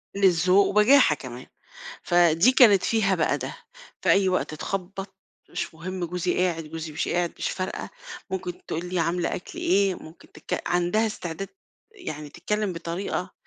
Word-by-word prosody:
قِلّة 195 Hz, -1 st, +5 dB, 0.2 s
ذوق 195 Hz, +2 st, +6 dB
وبجاحة 210 Hz, -, +5 dB
كمان. 125 Hz, -2 st, -9 dB, 0.6 s
فدي 175 Hz, +6 st, +5 dB
كانت 210 Hz, -8 st, +6 dB
فيها 200 Hz, -4 st, +2 dB
بقى 160 Hz, -, +1 dB
ده، -, -, -6 dB, 0.4 s
في -, -, 0 dB
أي 195 Hz, -1 st, +4 dB
وقت 185 Hz, -3 st, -1 dB
تخبّط 195 Hz, +3 st, -5 dB, 0.3 s
مش -, -, -4 dB
مُهم 180 Hz, +2 st, -4 dB
جوزي 180 Hz, +1 st, -1 dB
قاعد، 175 Hz, -3 st, +1 dB
جوزي 160 Hz, 0 st, -6 dB
مش 150 Hz, -, -2 dB
قاعد 175 Hz, -1 st, 0 dB
مش -, -, -2 dB
فارقة، 185 Hz, 0 st, -4 dB, 0.4 s
ممكن 180 Hz, -2 st, -5 dB
تقول 165 Hz, +2 st, -3 dB
لي 180 Hz, -1 st, -2 dB
عاملة 170 Hz, +2 st, 0 dB
أكل 180 Hz, -, -8 dB
إيه؟ 195 Hz, 0 st, +2 dB
ممكن 160 Hz, +2 st, -14 dB
تتك -, -, -4 dB
عندها 175 Hz, +6 st, +2 dB
استعداد 180 Hz, -2 st, -5 dB, 0.4 s
يعني 155 Hz, -, -7 dB
تتكلّم 210 Hz, +3 st, -2 dB
بطريقة 175 Hz, +2 st, -4 dB
180 Hz, 155 wpm, -25 LUFS, 165-195 Hz, 0.6 s, ذوق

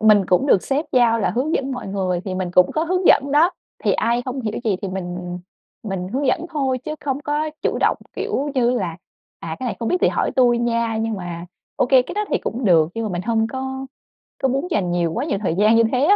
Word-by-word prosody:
mình 210 Hz, -3 st, +5 dB
cũng 185 Hz, +10 st, +2 dB
được 195 Hz, -, +4 dB
sếp 285 Hz, +4 st, -1 dB
giao 235 Hz, -2 st, +4 dB
là 205 Hz, -, +1 dB
hướng 275 Hz, +7 st, -1 dB
dẫn 270 Hz, 0 st, -1 dB
mọi 250 Hz, -4 st, -5 dB
người 185 Hz, -2 st, -1 dB
thì 185 Hz, -2 st, -3 dB
mình 185 Hz, -1 st, -2 dB
cũng 180 Hz, 0 st, +4 dB
có 315 Hz, +1 st, 0 dB
hướng 365 Hz, +1 st, 0 dB
dẫn 280 Hz, 0 st, +5 dB
đó. 315 Hz, +5 st, +5 dB, 0.3 s
Thì -, -, +3 dB
ai 235 Hz, +1 st, +1 dB
không 260 Hz, +1 st, -4 dB
hiểu 215 Hz, -2 st, -3 dB
gì 210 Hz, -4 st, +1 dB
thì 200 Hz, -, -2 dB
mình 180 Hz, -1 st, -5 dB, 0.5 s
mình 185 Hz, -2 st, -3 dB
hướng 270 Hz, +6 st, -1 dB
dẫn 340 Hz, +4 st, +1 dB
thôi 270 Hz, -5 st, 0 dB
chứ 305 Hz, +5 st, -5 dB
không 275 Hz, -1 st, -2 dB
có 295 Hz, +1 st, -1 dB
chủ -, -, 0 dB
động, -, -, +3 dB, 0.2 s
kiểu 285 Hz, +2 st, -2 dB
như 245 Hz, -2 st, +3 dB
là 185 Hz, -10 st, -2 dB, 0.4 s
"À, 160 Hz, -1 st, -5 dB
cái 255 Hz, -, -4 dB
này -, -, -3 dB
không 230 Hz, -, -1 dB
biết 360 Hz, -, +2 dB
thì -, -, +4 dB
hỏi -, -, 0 dB
tui 240 Hz, -2 st, +4 dB
nha!" 230 Hz, -1 st, 0 dB
Nhưng 225 Hz, 0 st, -1 dB
mà 175 Hz, -2 st, -6 dB, 0.3 s
ô -, -, +2 dB
kê 255 Hz, -1 st, +5 dB
cái -, -, -8 dB
đó 420 Hz, +1 st, 0 dB
thì -, -, +1 dB
cũng 240 Hz, +3 st, -4 dB
được. 165 Hz, -5 st, +5 dB
Nhưng 230 Hz, 0 st, -2 dB
mà 210 Hz, -, -2 dB
mình 175 Hz, +1 st, -2 dB
hông 225 Hz, 0 st, +1 dB
có 265 Hz, +1 st, -5 dB, 0.6 s
có 265 Hz, -, +3 dB
muốn 275 Hz, +7 st, -1 dB
dành 180 Hz, -3 st, 0 dB
nhiều 170 Hz, -2 st, 0 dB
quá -, -, -2 dB
nhiều 200 Hz, -, -1 dB
thời 170 Hz, -4 st, 0 dB
gian 215 Hz, +3 st, +4 dB
như 230 Hz, -, +5 dB
thế 255 Hz, +1 st, +1 dB
á. 405 Hz, +4 st, +6 dB
235 Hz, 260 wpm, -21 LUFS, 190-270 Hz, 0.6 s, á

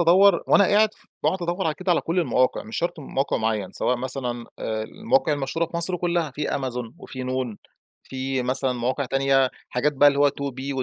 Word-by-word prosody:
أدوّر 180 Hz, +2 st, +5 dB
وأنا 200 Hz, -, +6 dB
قاعد 215 Hz, +2 st, +3 dB
ف -, -, -19 dB, 0.2 s
باقعُد 185 Hz, -1 st, +1 dB
أدوّر 175 Hz, +3 st, -1 dB
على 155 Hz, -, 0 dB
كده 185 Hz, +1 st, 0 dB
على -, -, +2 dB
كل 170 Hz, +3 st, -2 dB
المواقع، 130 Hz, -5 st, +1 dB
مش 110 Hz, -, -7 dB
شرْط 170 Hz, -1 st, -2 dB
موقِع 135 Hz, 0 st, -1 dB
مُعيّن 110 Hz, -3 st, -1 dB
سواء 125 Hz, -, 0 dB
مثلًا 125 Hz, -2 st, -4 dB
آآ 110 Hz, -1 st, -2 dB
المواقع 220 Hz, -, +1 dB
المشهورة 150 Hz, +4 st, -1 dB
في 170 Hz, -, -6 dB
مصر 170 Hz, +2 st, +1 dB
كلّها 170 Hz, -3 st, 0 dB
في 150 Hz, +3 st, -3 dB
Amazon 125 Hz, -3 st, -3 dB
وفي 130 Hz, -7 st, -7 dB
noon 130 Hz, -3 st, -2 dB, 0.5 s
في 130 Hz, 0 st, -3 dB
مثلًا 130 Hz, +1 st, 0 dB
مواقع 125 Hz, +3 st, -1 dB
تانية، 135 Hz, 0 st, +2 dB, 0.2 s
حاجات 145 Hz, +4 st, +1 dB
بقى 145 Hz, +1 st, +6 dB
اللي 140 Hz, -1 st, 0 dB
هو 145 Hz, 0 st, +6 dB
2B 140 Hz, -1 st, -4 dB
و 135 Hz, -1 st, -1 dB
135 Hz, 205 wpm, -24 LUFS, 130-170 Hz, 0.5 s, وأنا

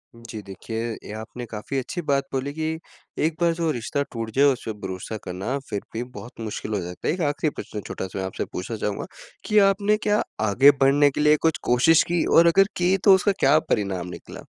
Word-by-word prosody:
जी, 115 Hz, -2 st, -9 dB
देखिए, 110 Hz, +4 st, -5 dB
ये -, -, -9 dB
आपने 120 Hz, +2 st, -7 dB
काफ़ी 110 Hz, +4 st, -5 dB
अच्छी 155 Hz, +7 st, -4 dB
बात 140 Hz, -1 st, +2 dB
बोली 135 Hz, +2 st, -2 dB
कि 160 Hz, +1 st, -3 dB, 0.5 s
एक 160 Hz, 0 st, 0 dB
बार 170 Hz, -1 st, +4 dB
जो 165 Hz, -1 st, -1 dB
रिश्ता 125 Hz, +2 st, -2 dB
टूट 115 Hz, -1 st, -5 dB
जाए, 140 Hz, +2 st, +5 dB
उस 135 Hz, -3 st, +2 dB
पे 110 Hz, -, -2 dB
भरोसा 95 Hz, +3 st, -5 dB
करना 95 Hz, +9 st, -3 dB
फिर 100 Hz, -, -2 dB
भी 115 Hz, -, -2 dB
बहुत 125 Hz, -1 st, -11 dB
मुश्किल 110 Hz, 0 st, -4 dB
हो 105 Hz, -, 0 dB
जाता 90 Hz, +1 st, -6 dB
है। -, -, +2 dB
एक 180 Hz, -, -4 dB
आख़िरी 150 Hz, +2 st, -1 dB
प्रश्न 105 Hz, -, -6 dB
छोटा-सा 95 Hz, +1 st, -5 dB
मैं 95 Hz, -, -2 dB
आपसे 95 Hz, -, -4 dB
पूछना 110 Hz, +5 st, -5 dB
चाहूँगा, 105 Hz, -1 st, -3 dB, 0.4 s
कि 215 Hz, -, +1 dB
आपने 205 Hz, +2 st, +1 dB
क्या 210 Hz, 0 st, +3 dB, 0.3 s
आगे 135 Hz, +8 st, +7 dB
बढ़ने 140 Hz, +2 st, +5 dB
के 145 Hz, -, -2 dB
लिए 150 Hz, 0 st, +5 dB
कुछ 160 Hz, -, +1 dB
कोशिश 125 Hz, +7 st, +4 dB
की 175 Hz, -2 st, +2 dB
और 170 Hz, +1 st, +7 dB
अगर 195 Hz, +3 st, +5 dB
की 180 Hz, +2 st, +3 dB
तो 195 Hz, -, +8 dB
उसका 190 Hz, +2 st, +2 dB
क्या 140 Hz, +3 st, +5 dB
परिणाम 95 Hz, -, -2 dB
निकला? 90 Hz, -, -10 dB
130 Hz, 215 wpm, -24 LUFS, 105-160 Hz, 0.5 s, तो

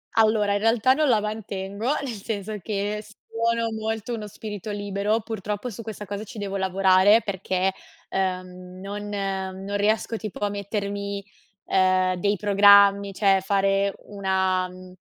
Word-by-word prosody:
Allora 215 Hz, -2 st, +3 dB
in 205 Hz, -, +1 dB
realtà 225 Hz, +3 st, +4 dB
non 300 Hz, -1 st, +2 dB
la 225 Hz, -, +4 dB
mantengo, 210 Hz, 0 st, -4 dB, 0.2 s
nel 270 Hz, -, -3 dB
senso 210 Hz, 0 st, -4 dB
che 210 Hz, +2 st, -2 dB
sono 230 Hz, +2 st, -2 dB
molto 220 Hz, +1 st, -3 dB
uno 215 Hz, -2 st, -5 dB
spirito 210 Hz, 0 st, -7 dB
libero, 205 Hz, +2 st, -1 dB
purtroppo 210 Hz, +2 st, -4 dB
su 225 Hz, -, -8 dB
questa 215 Hz, -2 st, -7 dB
cosa 200 Hz, +1 st, -5 dB
ci 220 Hz, -, -11 dB
devo 200 Hz, -1 st, -4 dB
lavorare, 190 Hz, +3 st, +4 dB
perché, 190 Hz, -1 st, -1 dB, 0.4 s
ehm, 185 Hz, -1 st, -3 dB
non 205 Hz, +1 st, -6 dB
non 195 Hz, -1 st, -3 dB
riesco 215 Hz, +2 st, +1 dB
tipo 215 Hz, -3 st, -7 dB
a -, -, 0 dB
mettermi, 200 Hz, 0 st, -4 dB, 0.4 s
ehm, 185 Hz, -1 st, +3 dB
dei 205 Hz, +3 st, +2 dB
programmi, 200 Hz, 0 st, +6 dB
cioè, 195 Hz, -1 st, +3 dB
fare 195 Hz, 0 st, +1 dB
una 190 Hz, -2 st, 0 dB
mhmm, 185 Hz, 0 st, -12 dB
200 Hz, 145 wpm, -24 LUFS, 190-215 Hz, 0.4 s, programmi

